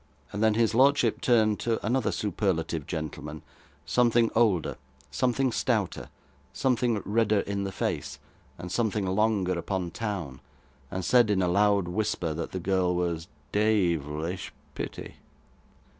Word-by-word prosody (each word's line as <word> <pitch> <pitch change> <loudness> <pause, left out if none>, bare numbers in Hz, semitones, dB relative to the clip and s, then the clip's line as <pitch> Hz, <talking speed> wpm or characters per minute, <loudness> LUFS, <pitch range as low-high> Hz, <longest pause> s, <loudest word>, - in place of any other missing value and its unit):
And 105 - -3
then 110 -1 +4
his 115 -1 +2
lordship 135 +4 +3
turned 110 -9 +3
to 115 -3 -1
another 115 -1 +1
superlative 85 -5 -1
gentleman, 75 -2 -5 0.4
something 115 +7 +3
older, 105 -8 +2 0.3
something 130 +1 +1
stouter, - - -1 0.4
something 120 -5 +1
redder 105 0 +2
in 100 0 -3
the 95 - -3
face, - - -3 0.4
and 90 0 -7
something 105 -2 0
longer 95 -1 +1
upon 90 -1 -3
town, 90 - -4 0.5
and 95 +3 -4
said 120 0 +5
in 95 -2 +2
a - - +2
loud 100 0 +3
whisper 90 -3 -1
that - - -4
the 95 - -3
girl 90 0 +1
was 85 -1 -2 0.2
'deyvlish 85 -6 0 0.2
pitty. - - -7
100 Hz, 130 wpm, -27 LUFS, 90-110 Hz, 0.5 s, said